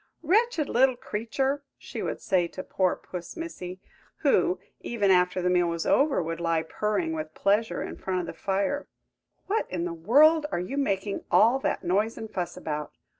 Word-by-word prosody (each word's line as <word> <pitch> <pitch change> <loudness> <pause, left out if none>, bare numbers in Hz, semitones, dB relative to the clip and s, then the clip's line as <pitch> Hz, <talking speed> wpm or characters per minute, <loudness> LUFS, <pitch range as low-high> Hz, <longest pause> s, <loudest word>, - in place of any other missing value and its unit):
"Wretched 375 -2 +2
little 260 +1 +3
creature!" 265 +6 -2 0.2
she - - -7
would - - -3
say 180 -2 +1
to 185 +2 -7
poor 185 -2 +1
Puss 175 -2 -8
Missy, 185 - -6 0.4
who, 185 - +3 0.2
even 205 -5 +1
after 180 0 +3
the 180 - +2
meal 175 -1 +3
was 170 -1 -2
over, 280 - +3
would 165 +1 -4
lie 165 -1 +1
purring 185 -1 -1
with 155 0 -5
pleasure 210 +3 +1
in - - -7
front 185 -1 -2
of - - -5
the - - -6
fire; 200 +9 -1 0.6
"what 435 +3 -1
in 175 -2 -2
the 175 - -3
world 295 - +5
are - - 0
you 180 +10 -4
making 200 -7 -1
all 235 +5 +5
that - - -1
noise 205 +6 +1
and 220 - -7
fuss 180 -2 -3
about? 150 -1 -4
195 Hz, 180 wpm, -27 LUFS, 175-265 Hz, 0.6 s, world